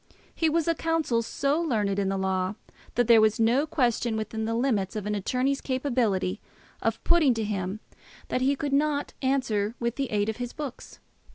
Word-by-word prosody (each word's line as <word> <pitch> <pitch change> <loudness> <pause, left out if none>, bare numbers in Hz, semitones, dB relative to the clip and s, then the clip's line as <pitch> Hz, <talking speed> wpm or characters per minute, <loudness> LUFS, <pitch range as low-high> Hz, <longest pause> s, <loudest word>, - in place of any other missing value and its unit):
He 325 - +1
was 325 +1 +1
a 335 - +4
counsel 325 -8 0
so 280 +7 0
learned 210 -10 0
in 195 -1 0
the 195 - -1
law, 190 0 -1 0.4
that 245 - +3
there 230 -2 +7
was 215 0 +3
no 245 +7 +3
question 240 -6 +1
within 220 +1 -3
the 225 +1 -1
limits 230 -5 0
of 210 -2 -3
an 210 - -1
attorney's 255 +7 0
capability 235 -8 0 0.4
of 225 0 -1
putting 315 -8 +4
to 225 - -1
him, 200 0 -3 0.5
that 255 - 0
he 275 +2 +3
could 285 -1 -3
not 290 0 +1
answer 240 -6 0
with 235 0 -2
the 275 -2 -1
aid 205 -1 0
of 220 - -2
his 245 -1 -5
books. 285 -5 -7
235 Hz, 190 wpm, -27 LUFS, 210-275 Hz, 0.5 s, there